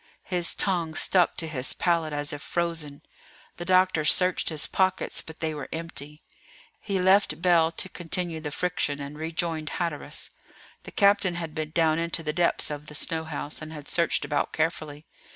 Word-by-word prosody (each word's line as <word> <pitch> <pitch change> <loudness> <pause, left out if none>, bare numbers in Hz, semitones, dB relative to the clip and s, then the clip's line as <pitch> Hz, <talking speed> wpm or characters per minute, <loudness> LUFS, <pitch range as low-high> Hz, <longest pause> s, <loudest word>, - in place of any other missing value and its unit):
His 175 -2 +1
tongue 170 -5 0
stuck 180 +1 +3
to 165 - -3
his 135 -5 -2
palate 165 -3 +1
as 145 0 -2
if 145 - -6
frozen. 165 -4 -3 0.5
The 175 - -5
doctor 185 -3 +4
searched 180 +4 +3
his 155 -2 +1
pockets, 190 -1 +1
but 160 - -12
they 160 -1 -1
were 145 -2 -6
empty. 155 -2 -6 0.6
He 195 -3 -1
left 190 +1 +4
Bell 170 -2 +4
to 175 - -2
continue 175 -2 -2
the 155 -1 -4
friction, 145 -2 -1
and 140 +1 -6
rejoined 160 0 -2
Hatteras. 170 -4 -3 0.5
The - - -8
captain 200 -3 +4
had 165 -3 -4
been 155 -1 -3
down 160 0 +2
into 170 0 -2
the 150 - -2
depths 170 -3 +1
of 150 0 -6
the 150 - -7
snow 160 +1 -1
house, 150 -1 -5
and 155 0 -7
had 150 -2 -9
searched 170 -4 +1
about 145 0 -1
carefully. 155 -2 -2
160 Hz, 175 wpm, -27 LUFS, 150-175 Hz, 0.6 s, doctor